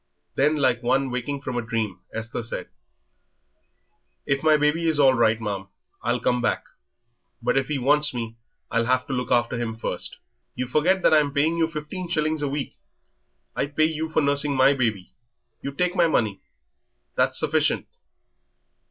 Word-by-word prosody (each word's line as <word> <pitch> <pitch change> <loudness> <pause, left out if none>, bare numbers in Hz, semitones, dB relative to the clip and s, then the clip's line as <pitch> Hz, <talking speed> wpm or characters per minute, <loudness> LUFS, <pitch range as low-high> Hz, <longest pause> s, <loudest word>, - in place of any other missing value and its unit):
Then, 150 +3 +2
like 130 -5 +2
one 135 +2 +1
waking 130 +3 -3
from 130 -3 -3
a - - +1
dream, 110 -5 -3
Esther 115 +1 -4
said: 115 - -6 1.6
"If 140 0 0
my 155 -1 +5
baby 150 +3 +1
is 160 -2 +2
all 135 -2 +6
right, 115 -2 +3
ma'am, 100 -3 -4 0.3
I'll 120 +1 0
come 125 +1 +1
back, - - 0 0.8
but 120 - 0
if 135 -1 +1
he 150 - -1
wants 145 +3 +3
me, 115 -2 -5 0.4
I'll 115 0 +1
have 130 0 +2
to 135 - -4
look 125 -2 -2
after 120 0 +1
him 115 -2 -3
first." 115 - -4 0.4
"You 125 - -2
forget 175 +8 +2
that - - +5
I'm 150 -2 +4
paying 150 +4 +2
you 165 - +3
fifteen 165 +3 -6
shillings 155 -2 0
a 145 - 0
week. 140 0 -4 0.8
I - - 0
pay 150 +2 +2
you 160 0 -2
for 155 - +2
nursing 140 0 +2
my 130 +2 +5
baby; 110 -8 -2 0.5
you 140 - -4
take 180 +5 -1
my 170 -2 +4
money, 110 -10 0 0.7
that's - - +1
sufficient." - - +1
135 Hz, 170 wpm, -24 LUFS, 120-150 Hz, 1.6 s, all